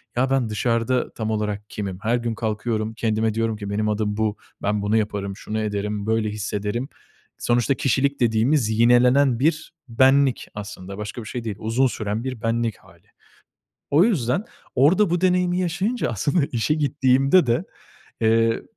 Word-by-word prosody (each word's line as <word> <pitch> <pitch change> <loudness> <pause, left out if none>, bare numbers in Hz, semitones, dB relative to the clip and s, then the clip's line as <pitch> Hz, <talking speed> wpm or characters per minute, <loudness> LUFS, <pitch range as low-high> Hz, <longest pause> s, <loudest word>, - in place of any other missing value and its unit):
ya 130 +2 +1
ben 130 -4 +1
dışarıda 115 +3 0
tam 110 -1 -3
olarak 105 -1 -3
kimim, 95 -3 -5
her 115 +3 +1
gün 115 -2 -3
kalkıyorum 110 0 -2
kendime 110 -1 0
diyorum 115 0 -1
ki 100 -1 -6
benim 105 +1 -1
adım 105 -1 -1
bu, 110 -1 0 0.2
ben 105 0 0
bunu 105 +2 +1
yaparım, 100 -2 -2
şunu 110 +1 -4
ederim, 105 -1 -2
böyle 110 -1 +1
hissederim. 105 +4 -3 0.5
Sonuçta 120 +3 +2
kişilik 140 +2 0
dediğimiz 115 +2 +2
yinelenen 125 +2 +4
bir 155 +4 0 0.2
benlik 135 +2 +3
aslında 100 -2 -8
başka 105 +3 -6
bir - - -10
şey 120 0 -5
değil, 110 -3 -4
uzun 120 +5 +1
süren 110 0 -3
bir 130 -4 -5
benlik 115 -1 -1
hâli. - - -22 0.8
O 150 +5 +5
yüzden 165 - +1 0.3
orada 165 +8 +4
bu 175 - +1
deneyimi 180 -1 +2
yaşayınca 185 - -1
aslında 140 - 0
işe 120 +6 +1
gittiğimde 140 +2 +3
de, 120 0 +1 0.6
eee, 115 0 +2
115 Hz, 155 wpm, -23 LUFS, 105-135 Hz, 0.8 s, O